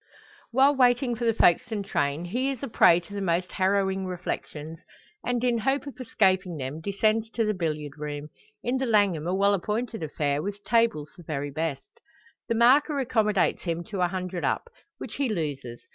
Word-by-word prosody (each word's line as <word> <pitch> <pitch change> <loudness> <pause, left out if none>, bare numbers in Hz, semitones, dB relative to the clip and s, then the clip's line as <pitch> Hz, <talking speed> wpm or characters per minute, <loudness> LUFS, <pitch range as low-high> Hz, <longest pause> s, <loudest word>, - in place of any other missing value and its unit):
While 270 +4 +4
waiting 245 -1 +3
for 235 +1 -3
the 230 - +3
Folkestone 215 +2 +3
train, 145 -4 -1
he 250 +9 -1
is 270 -1 -5
a - - -2
prey 175 -7 +5
to 190 +4 -13
the 200 - -3
most 180 0 0
harrowing 190 0 +1
reflections, 165 -3 -5 0.4
and 245 -1 -1
in 240 -2 +2
hope 270 +5 0
of 265 -2 -8
escaping 190 -7 +1
them, 140 +3 -5
descends 215 +4 +1
to 230 - +1
the 215 - +1
billiard 155 -5 -3
room 150 0 -5 0.3
in 245 +2 0
the 260 0 -1
Langham 200 -8 +2
a 180 - 0
well 200 +1 +3
appointed 215 +3 -2
affair, 145 -2 -1
with 205 +3 -5
tables 230 -11 +1
the - - -11
very 145 -2 -4
best. 155 -2 -4 0.5
The 230 - +1
marker 275 +6 +4
accommodates 220 -7 +1
him 170 -1 -3
to 195 -3 -2
a 180 - +4
hundred 180 -1 -4
up, 475 - -1 0.3
which 215 - -8
he 275 -3 0
loses. 140 - -4
195 Hz, 185 wpm, -26 LUFS, 165-235 Hz, 0.5 s, prey